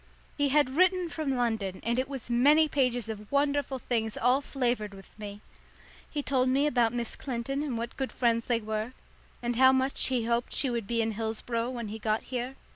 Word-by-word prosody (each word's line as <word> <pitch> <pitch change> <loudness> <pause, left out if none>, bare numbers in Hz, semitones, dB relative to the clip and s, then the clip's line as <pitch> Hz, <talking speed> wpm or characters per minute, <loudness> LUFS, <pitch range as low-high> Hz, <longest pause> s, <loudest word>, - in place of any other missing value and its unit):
He 285 -1 +1
had 275 -2 +3
written 365 0 +3
from 305 -5 -2
London, 220 -6 -1
and 235 +2 +1
it 260 - -1
was 270 -4 -6
many 285 +6 +5
pages 250 -5 +1
of 210 -2 -7
wonderful 280 -1 +1
things 225 -3 -2
all 250 +3 +3
flavoured 240 -7 -1
with 195 -1 -14
me. 205 -1 -7 0.7
He 290 -2 -3
told 260 -2 +2
me 275 +3 +3
about 240 -6 +3
Miss 240 -1 -3
Clinton 270 +2 -3
and 275 -6 -2
what 235 +1 -4
good 265 -1 -2
friends 230 -2 +1
they 235 -2 +1
were, 215 +3 -3 0.5
and 240 -1 -1
how 260 +1 +7
much 265 +1 +1
he 250 -3 0
hoped 235 +1 0
she 270 - +1
would 235 -4 -2
be 230 0 +1
in 225 - -1
Hillsboro 225 +2 -2
when 235 -4 -5
he 220 +2 -6
got 215 0 0
here. 255 +1 -4
245 Hz, 200 wpm, -29 LUFS, 225-270 Hz, 0.7 s, how